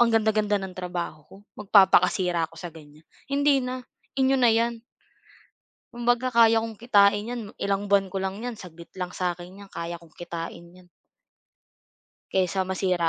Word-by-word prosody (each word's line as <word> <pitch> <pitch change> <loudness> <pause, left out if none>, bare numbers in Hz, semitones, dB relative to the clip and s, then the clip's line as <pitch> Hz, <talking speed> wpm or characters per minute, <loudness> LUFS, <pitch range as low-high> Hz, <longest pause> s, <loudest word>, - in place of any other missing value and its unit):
ang 240 -1 +5
ganda-ganda 215 -2 +2
ng 190 -1 -7
trabaho 175 -4 -5
ko - - -13 0.2
magpapakasira 190 -4 +4
ako - - -17
sa 175 - -6
ganyan? 155 0 -16 0.2
Hindi 280 -1 +3
na, 255 0 -4 0.4
inyo 265 0 +3
na 245 -2 +5
yan. 230 +1 +1 1.1
Kumbaga 240 +1 +1
kaya 230 -2 +5
kong 225 -2 -6
kitain 205 -3 +4
'yan 245 -1 -3 0.2
ilang 200 0 -1
buwan 200 -1 +4
ko 190 - -1
lang 190 +1 -3
'yan 245 +1 -4
saglit 175 -5 -13
lang 180 -1 -4
sa'kin 180 +1 -4
'yan 200 -1 -13
kaya 170 +1 -5
kong 165 -2 -20
kitain 170 -1 -7
'yan. 180 0 -18 1.5
Kaysa 190 0 +1
masira 185 -3 +1
195 Hz, 155 wpm, -25 LUFS, 175-230 Hz, 1.5 s, ang